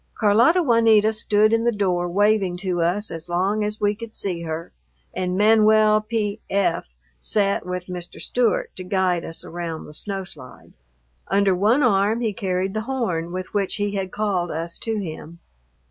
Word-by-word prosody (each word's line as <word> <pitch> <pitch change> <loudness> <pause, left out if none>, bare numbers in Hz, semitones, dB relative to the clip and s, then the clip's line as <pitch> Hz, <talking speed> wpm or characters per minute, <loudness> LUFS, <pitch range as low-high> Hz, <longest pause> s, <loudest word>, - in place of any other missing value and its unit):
Carlota 235 - +4
Juanita 225 -4 +4
stood 215 0 +2
in 230 0 +2
the 240 - +3
door, 180 -4 0
waving 200 -1 +2
to 180 -2 -2
us 185 +6 0
as 165 +1 -7
long 195 +5 0
as 210 +1 -3
we 205 0 +2
could 225 +1 -9
see 180 -4 -3
her, 165 0 -5 0.4
and 180 0 -2
Manuel 215 0 +5
P.F. 205 -4 -1 0.3
sat 200 - 0
with 180 -1 -4
Mr. 180 -1 -8
Stewart 245 -3 0
to 185 - -6
guide 180 -2 0
us 165 - -5
around 165 -2 -5
the 150 - -12
snow 195 +4 -3
slide. 145 -8 -12 0.5
Under 195 0 +3
one 220 +10 +3
arm 210 -1 +2
he 220 -3 -1
carried 190 -2 -2
the 215 - -2
horn 180 -11 -2
with 185 +1 -6
which 200 -2 0
he 205 -1 -1
had 190 -2 -3
called 195 -5 -1
us 165 +2 -4
to 225 -1 -2
him. 165 -2 -7
200 Hz, 170 wpm, -22 LUFS, 180-215 Hz, 0.5 s, Manuel